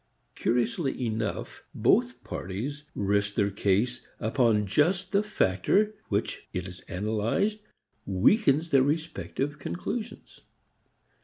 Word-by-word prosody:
Curiously 130 +5 0
enough 110 -2 -3
both - - +2
parties 135 +11 -5
rest 100 0 +1
their 100 -1 +2
case 105 +5 +1 0.2
upon 110 -2 +2
just 175 - +2
the 200 0 +4
factor 210 - +2 0.2
which - - -2
when 90 - -3
it - - -7
is 90 -1 -9
analyzed 110 - 0 0.5
weakens 145 - +3
their 135 - +6
respective 145 -1 -2
conclusions. 215 - -5
120 Hz, 105 wpm, -28 LUFS, 100-165 Hz, 0.5 s, their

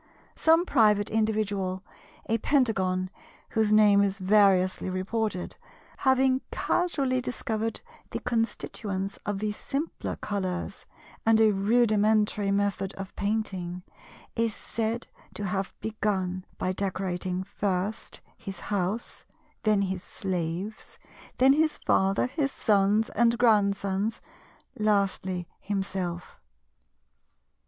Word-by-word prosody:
Some 325 +2 +4
private 210 - +3
individual—a 215 0 -2
Pentagon 190 -9 +1 0.4
whose 220 -1 +2
name 210 -2 +6
is 200 0 +1
variously 190 -2 +3
reported—having 230 +6 -1
casually 275 -8 0
discovered 225 -3 -3 0.3
the - - -3
constituents 210 -4 -2
of 205 -1 -1
the 210 +1 -1
simpler 280 +9 -4
colours 190 -2 -4 0.4
and 225 0 +4
a 220 -1 +6
rudimentary 210 -1 +2
method 200 -1 0
of 195 0 -8
painting, 190 -4 -2 0.5
is 230 -2 0
said 230 +1 -3 0.3
to 205 - -3
have 195 0 -2
begun 190 -4 -2
by 185 - -1
decorating 185 -1 -2
first 195 +2 -3 0.2
his 195 -4 -7
house, 200 +4 -3 0.4
then 210 -2 +3
his 190 -2 -2
slaves, 185 +3 -4 0.4
then 265 +2 +6
his 310 +1 +2
Father, 195 +1 +2
his 275 +1 -1
Sons, 210 0 +2
and 235 +1 +3
Grandsons, 205 -2 +2 0.6
lastly 195 -4 0
himself. 190 -3 -4
205 Hz, 100 wpm, -27 LUFS, 190-225 Hz, 0.6 s, name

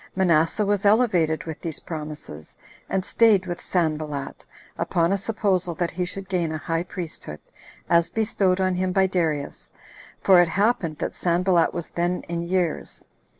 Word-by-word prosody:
Manasseh 175 +2 +2
was 205 -1 0
elevated 200 -8 +3
with 160 -2 -7
these 165 -3 -5
promises, 150 - -8 0.3
and 190 -1 -1
staid 215 -5 +4
with 175 -1 -5
Sanballat, 155 -5 -2 0.3
upon 170 0 +1
a 200 - +2
supposal 190 -5 0
that 175 0 -1
he 180 +1 -2
should 195 +2 -7
gain 175 -4 -1
a 155 - -2
high 165 +2 -2
priesthood, 170 - -7 0.5
as 170 0 +3
bestowed 200 -4 +1
on 185 -1 +1
him 185 +1 0
by 190 0 +4
Darius, 160 -6 -2 0.5
for 185 -2 +6
it 175 - +2
happened 190 -4 +1
that - - -3
Sanballat 175 -1 +2
was 170 -2 -5
then 175 +1 -1
in 170 0 -3
years. 175 -1 -2
175 Hz, 155 wpm, -24 LUFS, 165-190 Hz, 0.5 s, for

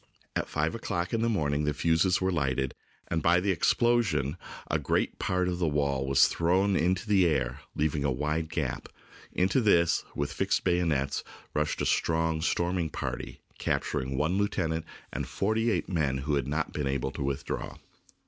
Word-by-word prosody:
At - - -1
five 75 +2 0
o'clock 90 -5 -3
in 115 - +1
the 115 - +2
morning 75 -8 0
the 75 -1 0
fuses 85 +4 +2
were 95 0 +1
lighted, 65 -5 0 0.4
and 85 - 0
by 85 +3 +4
the 95 +2 +1
explosion 90 - +2 0.3
a - - 0
great - - 0
part 90 -1 0
of 90 -1 -2
the 85 - +1
wall 70 -3 0
was 70 0 +6
thrown 95 +4 +2
into 95 +4 +1
the 95 -4 +4
air, 65 -6 0 0.2
leaving 75 -1 0
a 70 - +2
wide 75 +4 -1
gap. - - -3 0.4
Into 95 +8 +2
this, 85 -6 +3
with 70 0 -2
fixed - - 0
bayonets, 80 -6 +1 0.3
rushed 75 0 0
a - - 0
strong 80 -1 +1
storming 85 0 0
party, - - -5 0.2
capturing 65 -2 -1
one 80 +7 +1
lieutenant 80 -5 -1 0.3
and - - -3
forty 110 +3 0
eight - - 0
men 75 -7 0
who 70 +3 -2
had 70 -2 0
not 75 +2 -2
been 75 -2 -2
able 65 -1 -1
to - - -7
withdraw. 70 +1 -3
80 Hz, 175 wpm, -29 LUFS, 70-90 Hz, 0.4 s, was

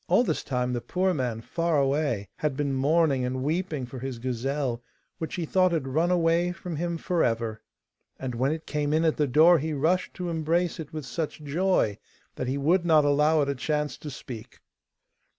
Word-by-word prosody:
All - - +4
this - - -1
time 125 -1 -1
the 120 - -2
poor 185 +9 0
man 125 -7 -2
far 165 +4 0
away 135 -7 0
had 150 -3 -1
been 145 -2 0
mourning 140 0 +2
and 130 +1 -2
weeping 155 -2 -1
for 125 +1 -8
his 130 -1 -5
gazelle, 130 +1 -2 0.4
which 160 - -4
he 175 -3 -2
thought 185 +2 +3
had 155 -6 -1
run 160 +6 +1
away 170 0 +2
from 175 -2 -6
him 170 +1 -2
for 170 +1 0
ever. 115 -2 -1 0.6
And 130 -2 -4
when 130 +4 +1
it 160 0 -4
came 150 -1 -1
in 160 +1 +2
at 160 - +2
the 150 - +2
door 160 +6 +6
he 155 +2 -2
rushed 160 +6 0
to 180 -1 -4
embrace 165 +2 0
it 155 -3 -7
with 155 -3 -6
such 150 +5 -4
joy 150 - +1 0.3
that 130 - -4
he 135 +2 -1
would 170 +6 +2
not 155 -3 +4
allow 150 +2 +4
it 140 - -2
a - - +1
chance 150 +3 -1
to 150 - -7
speak. 125 -4 -9
150 Hz, 205 wpm, -27 LUFS, 130-165 Hz, 0.6 s, door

